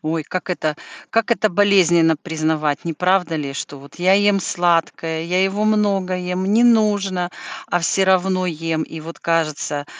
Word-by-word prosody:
Ой, 160 -2 -3
как 185 0 -5
это 155 -4 -1 0.4
как 225 +1 0
это 220 -2 +2
болезненно 175 -5 +3
признавать, 155 -2 -2
неправда 180 0 0
ли, 140 -3 -4
что 140 0 -7
вот 140 +2 -15
я 185 +2 +4
ем 205 0 +3
сладкое, 165 -2 -1
я 180 +3 0
его 200 +2 -1
много 200 -4 +1
ем, 180 +1 -3
не 220 +4 +3
нужно, 205 -6 +2 0.4
а 175 - +2
всё 190 +3 +1
равно 185 0 +2
ем, 165 -1 -2
и 160 - -8
вот 165 +2 -10
кажется, 155 -3 -1
180 Hz, 160 wpm, -20 LUFS, 160-195 Hz, 0.4 s, я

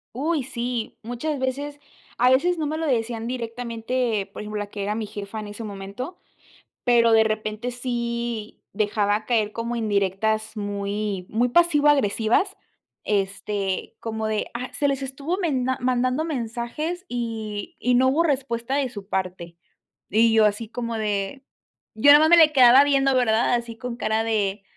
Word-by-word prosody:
Uy, 300 +2 0
sí, 240 -2 -4
muchas 245 +6 -3
veces. 280 +3 -3 0.4
A 250 +1 +5
veces 340 +7 +3
no 310 - -1
me 310 +2 -2
lo 325 - -2
decían 230 -3 -1
directamente, 230 -2 -2
por - - -7
ejemplo, 210 0 -5
la 205 - -3
que 205 -1 -6
era 205 +1 -1
mi 220 -2 -3
jefa 205 +1 -7
en 210 - -7
ese 205 +2 -8
momento, 205 - -7 0.7
pero, 235 -2 +4
de 220 0 +6
repente, 215 +2 -2
sí 235 -2 -4
dejaba 210 0 +1
caer 215 -3 +1
como 235 +2 -3
indirectas, 215 0 0
muy 205 -1 -3
muy 240 +3 +2
pasivo-agresivas, 295 - +3 0.5
este 200 -1 -2
como 220 -1 -3
de: 215 -1 -2
"Ah, 250 +2 -5
se 285 - +1
les 275 -1 -1
estuvo 275 +6 -3
menda 260 -8 0
mandando 255 +4 +1
mensajes 300 +7 -4
y 225 - -4
y 250 - +1
no 260 +1 +4
hubo 300 +6 +3
respuesta 260 -4 -1
de 275 -3 0
su 205 -4 -9
parte". 180 -3 -3 0.5
Y 225 +3 +4
yo 220 -1 +5
así, 210 +1 0
como 235 -1 -4
de 210 +4 -2 0.5
yo 285 +7 +6
nada 295 - +9
más 315 +1 +4
me 345 - +8
le 310 -2 +6
quedaba 255 +1 +8
viendo, 275 -1 +3
¿verdad? 240 -1 +2
Así 235 -1 -4
con 240 +1 -5
cara 220 -1 0
de: 205 -3 -1
235 Hz, 160 wpm, -24 LUFS, 215-260 Hz, 0.7 s, nada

